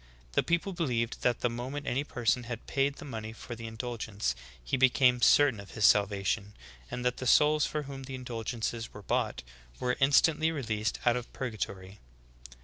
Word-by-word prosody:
The - - +3
people 170 +3 0
believed 125 -9 -1
that 125 -2 +1
the - - +3
moment 130 +5 -5
any 135 +2 0
person 120 -3 0
had 115 -1 -6
paid 140 0 0
the 160 - -10
money 110 -5 -6
for 120 - -8
the 115 0 -7
in 110 - -8
dulgence 110 - -2 0.3
he - - -1
became 125 -1 +4
certain 140 -6 +5
of 100 - -10
his 110 - +3
salvation; 100 0 +2 0.3
and 125 0 -5
that 125 0 +1
the 130 - -4
souls 150 +3 +5
for 150 -1 -3
whom 135 -1 -8
the 135 0 -6
indulgences 115 -2 -4
were 105 - -9
bought, - - -1 0.4
were 125 0 0
instant 145 +3 +4
ly 160 - +3
released 110 -9 -1
out 120 -1 +4
of 125 - -7
purgatory. 100 -5 -5
120 Hz, 185 wpm, -30 LUFS, 110-135 Hz, 0.4 s, certain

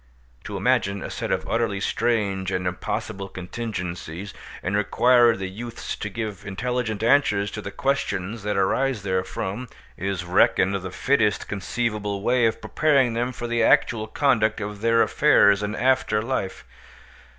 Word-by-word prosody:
To - - -5
imagine 100 0 +1
a - - -6
set - - -4
of - - -1
utterly 115 -4 0
strange 100 -4 0
and 90 -1 -2
impossible 95 +2 -3
contingencies, 90 -2 -6 0.3
and 95 +3 -1
require 120 +3 +4
the 95 0 -4
youths 115 +5 -6
to 105 - -4
give 105 -3 -5
intelligent 110 +1 -2
answers 105 -6 +3
to 110 - -5
the 100 - -6
questions 115 -5 -2
that 105 0 -2
arise 115 +4 +1
therefrom, 95 +4 -3 0.3
is 95 -2 -3
reckoned 90 +2 +3
the 95 -1 -3
fittest 105 0 +1
conceivable 105 0 -2
way 120 0 +3
of 110 - -3
preparing 140 -6 +2
them 120 +2 -1
for 120 - -6
the 120 0 0
actual 110 -1 +3
conduct 110 -4 +2
of 105 -1 -6
their 115 0 +4
affairs 100 0 +4
in 105 +1 -2
after 130 -4 +2
life. 115 -6 -3
105 Hz, 150 wpm, -24 LUFS, 95-120 Hz, 0.3 s, require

